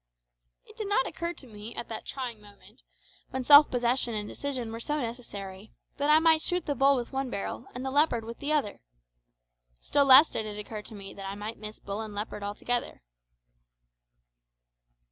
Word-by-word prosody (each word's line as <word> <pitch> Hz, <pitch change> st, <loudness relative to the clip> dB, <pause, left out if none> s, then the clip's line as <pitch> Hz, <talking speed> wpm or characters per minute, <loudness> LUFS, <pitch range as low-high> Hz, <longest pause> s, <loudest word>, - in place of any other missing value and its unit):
It 430 Hz, -, -17 dB
did 430 Hz, -3 st, -4 dB
not 405 Hz, -10 st, +2 dB
occur 340 Hz, +1 st, -4 dB
to 280 Hz, -, -14 dB
me 215 Hz, -1 st, -9 dB
at 235 Hz, -, -5 dB
that 220 Hz, -, -6 dB
trying 245 Hz, -5 st, -5 dB
moment, 205 Hz, -, -18 dB, 0.5 s
when 260 Hz, -, -3 dB
self 290 Hz, +3 st, +9 dB
possession 245 Hz, -1 st, +1 dB
and 210 Hz, -1 st, -3 dB
decision 255 Hz, -4 st, -4 dB
were 225 Hz, -, -6 dB
so 295 Hz, +5 st, -2 dB
necessary, 215 Hz, -5 st, -7 dB, 0.2 s
that 285 Hz, +1 st, 0 dB
I 305 Hz, -, +7 dB
might 320 Hz, 0 st, +4 dB
shoot 360 Hz, +2 st, -1 dB
the 290 Hz, -, 0 dB
bull 275 Hz, +1 st, +4 dB
with 245 Hz, -1 st, -4 dB
one 265 Hz, -1 st, -2 dB
barrel, 215 Hz, +3 st, -5 dB
and 250 Hz, +1 st, -5 dB
the 265 Hz, -, -2 dB
leopard 275 Hz, -6 st, +2 dB
with 230 Hz, +1 st, -8 dB
the 290 Hz, -, -2 dB
other. 295 Hz, -9 st, 0 dB, 1.0 s
Still 285 Hz, -1 st, +2 dB
less 275 Hz, +4 st, +9 dB
did 215 Hz, -, -4 dB
it 210 Hz, -1 st, -6 dB
occur 210 Hz, 0 st, -6 dB
to 215 Hz, -, -9 dB
me 195 Hz, -1 st, -8 dB
that 195 Hz, -1 st, -7 dB
I 195 Hz, -, -5 dB
might 210 Hz, +2 st, -6 dB
miss 215 Hz, 0 st, -7 dB
bull 200 Hz, +2 st, -5 dB
and 215 Hz, -2 st, -7 dB
leopard 210 Hz, 0 st, -4 dB
altogether. 205 Hz, -, -2 dB
240 Hz, 190 wpm, -28 LUFS, 210-280 Hz, 1.0 s, self